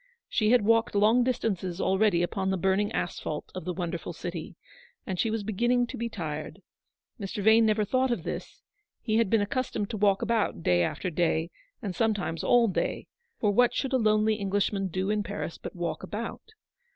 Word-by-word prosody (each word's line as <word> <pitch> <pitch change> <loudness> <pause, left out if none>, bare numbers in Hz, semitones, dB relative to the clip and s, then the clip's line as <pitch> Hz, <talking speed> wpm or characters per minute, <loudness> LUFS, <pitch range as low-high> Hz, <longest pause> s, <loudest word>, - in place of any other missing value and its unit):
She 215 -3 +1
had 245 -2 +5
walked 225 +1 +3
long 220 +4 +5
distances 195 -8 -1
already 190 -3 +2
upon 190 +2 -1
the 190 - +1
burning 190 +3 +1
asphalte 155 -3 -3
of 185 - -6
the 180 - -2
wonderful 175 -1 -4
city, 170 -1 -6 0.5
and 185 -2 -4
she 225 - +2
was 220 -1 -2
beginning 240 +4 +1
to - - -7
be 235 +1 -3
tired. 155 -1 -6 0.6
Mr. 200 0 -4
Vane 220 +1 +6
never 215 0 +2
thought 260 +4 +1
of 240 - -1
this: - - -6 0.4
he 220 -1 +1
had 230 -4 +2
been 225 0 +3
accustomed 220 -3 -2
to 220 - -3
walk 200 -1 +3
about 220 - 0
day 90 0 +3
after 180 - -1
day, 165 0 0 0.3
and 195 -4 -3
sometimes 205 -7 0
all 240 -1 +5
day 195 - -2 0.2
— 470 -1 -47
for 210 - +2
what 245 +3 +3
should 270 -1 -1
a - - +5
lonely 215 -1 +3
Englishman 200 -1 0
do 185 +3 -1
in 210 0 +1
Paris 205 -5 -5
but - - -8
walk 170 -3 -3
about 215 - -6
205 Hz, 190 wpm, -28 LUFS, 185-225 Hz, 0.6 s, Vane